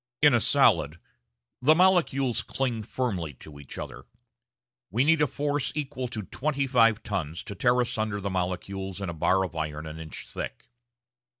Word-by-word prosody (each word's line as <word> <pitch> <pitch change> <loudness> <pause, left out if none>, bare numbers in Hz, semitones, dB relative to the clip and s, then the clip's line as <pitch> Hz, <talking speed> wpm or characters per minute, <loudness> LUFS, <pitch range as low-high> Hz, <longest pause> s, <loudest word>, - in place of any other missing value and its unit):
In 150 -3 +7
a 120 - +5
solid 75 -7 +4 0.6
the 155 +5 +6
molecules 160 -9 +3
cling 125 -4 -2
firmly 100 - -3
to 70 +3 -12
each 70 - -10
other. - - -7 0.8
We 115 +8 +2
need 160 +1 +4
a 150 - +4
force 145 +1 -1
equal 140 -3 -3
to 110 -3 -5
twenty 140 - -1
five 115 -4 +3
tons 85 -6 -3
to - - -7
tear 120 +5 +2
asunder 110 -4 -1
the 100 0 -3
molecules 95 +1 -3
in 100 -3 -3
a - - -3
bar 95 +4 +2
of 85 -2 -9
iron 75 -1 -3
an 80 0 -7
inch 80 -1 -7
thick. - - -6
110 Hz, 170 wpm, -27 LUFS, 90-135 Hz, 0.8 s, In